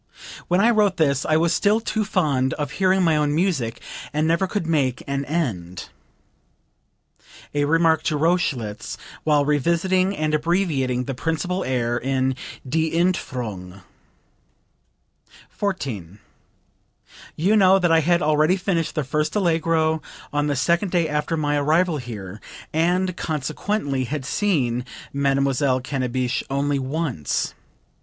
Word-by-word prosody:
When 180 +1 +2
I 230 +4 +5
wrote 210 -4 +2
this 140 -4 +1
I 155 - +3
was 165 +1 +2
still 210 +2 +3
too 220 -1 -1
fond 145 -11 +1
of 145 -1 -3
hearing 190 +1 +2
my 165 -2 +3
own 150 -1 +1
music, 155 -10 0 0.3
and 150 +1 0
never 170 +4 +2
could 200 -2 -2
make 140 -6 0
an 140 0 -2
end." 105 - -3 1.6
(A 145 0 +1
remark 165 +1 +3
to 150 - +1
Rochlitz 145 -10 -1 0.3
while 150 -2 +3
revising 175 +6 +1
and 155 0 -1
abbreviating 150 -6 +1
the 135 - -4
principal 165 +7 -2
air 120 -2 0
in 130 0 0 0.3
"Die 160 +4 +1
Entfuhrung.") 115 - -2 1.7
14. 115 - -4 1.2
"You 190 +7 +2
know 190 -2 +6
that 175 -3 +2
I 165 - +6
had 170 +2 +2
already 155 +4 +3
finished 175 -4 -1
the 150 - 0
first 150 +5 -1
Allegro 165 -4 +1 0.3
on 145 0 +1
the 145 - 0
second 170 +8 +1
day 170 -2 +1
after 150 +2 -1
my 145 -1 0
arrival 160 +3 +2
here, 110 -6 -7 0.3
and 180 +3 +1
consequently 145 -1 -2
had 140 +1 -4
seen 135 - 0 0.3
Mademoiselle 140 -1 +1
Cannabich 130 -1 -2
only 140 +1 0
once. 135 - -2
155 Hz, 130 wpm, -23 LUFS, 130-175 Hz, 1.7 s, know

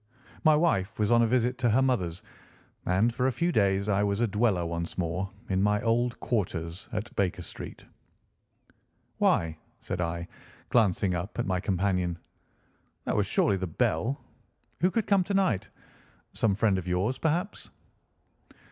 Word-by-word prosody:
My 155 -1 +6
wife 115 - +1
was 105 0 +1
on 120 0 +6
a 115 - +4
visit 125 +1 +1
to 120 -2 +2
her 115 +5 +4
mother's, 95 -8 0 0.6
and 100 +6 +3
for 125 +2 +1
a - - +2
few 170 +7 0
days 100 - +2
I 100 -1 +2
was 100 0 0
a 120 - +3
dweller 105 -4 +1
once 85 0 -4
more 90 +2 -1 0.2
in 95 0 +1
my 105 +1 +3
old 120 +1 +1
quarters 90 -4 -2
at 110 0 -4
Baker 95 -3 0
Street. - - -9 1.3
"Why," 80 -1 +2 0.2
said 90 - -4
I, 85 0 -3 0.4
glancing 100 -5 +2
up 85 +4 -4
at 120 - 0
my 95 -1 0
companion, 90 -2 0 0.9
"that - - 0
was 105 -2 +1
surely 100 0 +2
the 95 0 -3
bell. 85 - 0 0.6
Who 180 - +3
could 220 +2 0
come 200 -2 +3
to 200 +2 -2
night? 110 - +1 0.6
Some 105 -4 +1
friend 100 -2 +2
of 90 - -8
yours, 95 +9 0
perhaps?" 175 +6 -1
105 Hz, 160 wpm, -28 LUFS, 90-120 Hz, 1.3 s, My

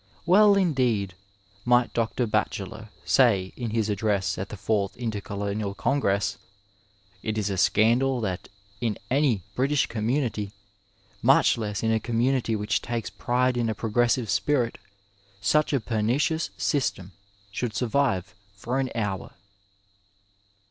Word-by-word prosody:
Well, 200 +4 +6
indeed, 125 - +1 0.5
might 120 0 +3
Dr. 115 +1 0
Batchelor, 105 0 -2 0.2
say, 100 -8 +3
in 120 -2 -4
his 110 -1 0
address 105 -2 0
at 95 - -4
the 105 - -7
fourth 100 0 -1
Intercolonial 100 -2 -3
Congress: 100 -5 0
'^ - - -31 0.8
It 110 0 -3
is 105 -1 -1
a - - -1
scandal 120 +7 +3
that 95 -4 -3 0.3
in 115 -3 -1
any 130 - +2
British 135 +1 +1
ccMnmnnity, 115 -2 -1 0.7
much - - +5
less 105 -3 -3
in 110 - +2
a 110 - +2
community 120 +1 0
which 105 0 0
takes 120 -2 -4
pride 125 +1 0
in 115 -2 0
a 110 - -2
progresaiye 120 +2 +1
spirit, 125 +2 0 0.6
such 150 +11 +2
a 140 - +2
pernicious 125 +9 0
system 100 - -1 0.4
should 115 +2 -3
survive 115 -6 0 0.2
for 120 +6 -2
an 130 -1 0
hour." 105 -4 -3
115 Hz, 130 wpm, -26 LUFS, 105-125 Hz, 0.8 s, Well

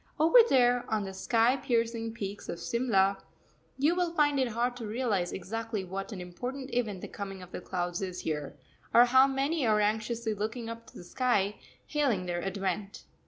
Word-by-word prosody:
Over 325 +10 +7
there, 245 -2 +4
on 215 -2 +1
the 190 -1 -6
sky 230 +5 +2
piercing 230 -2 -1
peaks 200 -2 -6
of 170 - -4
Simla, 200 -5 +1 0.6
you 295 +5 +3
will 350 -1 -1
find 290 -2 +3
it 260 - +2
hard 240 +2 -1
to 230 -3 -5
realise 210 -6 0
exactly 220 +2 -4
what 195 +3 -5
an 200 - -6
important 250 +10 -6
event 215 -6 -1
the - - -6
coming 195 -2 -7
of 180 - -13
the - - -6
clouds 175 -1 -3
is 185 -2 -4
here, 150 -2 -4 0.4
or 240 +1 +9
how 260 +2 +6
many 275 +3 0
are 215 -1 +4
anxiously 220 +2 0
looking 220 +3 -4
up 230 0 -8
to - - -14
the - - -9
sky, 205 -1 0 0.3
hailing 265 -11 0
their 175 -1 -2
advent. 195 +1 -3
225 Hz, 185 wpm, -30 LUFS, 195-245 Hz, 0.6 s, or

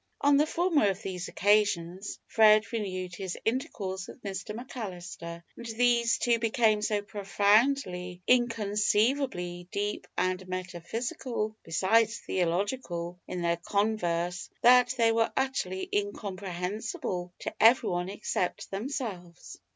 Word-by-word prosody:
On 285 0 +4
the 300 +2 +3
former 330 - +2
of 195 +1 -4
these 180 -2 -4
occasions 200 -2 +1
Fred 215 0 +5
renewed 185 -5 -3
his 185 0 -5
intercourse 195 -6 -2
with - - -12
Mr 200 +1 -5
McAllister, 180 -8 -7
and 235 - -9
these 235 +1 +3
two 235 -1 +2
became 225 -2 +2
so 210 -1 0
profoundly, 200 -2 +1
inconceivably, 210 -4 +1
deep 205 +1 -2
and 185 0 0
metaphysical, 215 +5 -4
besides 220 +7 +2
theological, 180 -1 -2
in 180 -1 -4
their 170 0 +1
converse, 180 -3 -1
that 250 +1 +6
they 230 -1 +4
were 225 0 +2
utterly 190 -9 -1
incomprehensible 195 -2 -3
to - - -4
everyone 185 -6 +4
except 195 -2 -3
themselves. 195 - -5
205 Hz, 110 wpm, -29 LUFS, 180-230 Hz, -, that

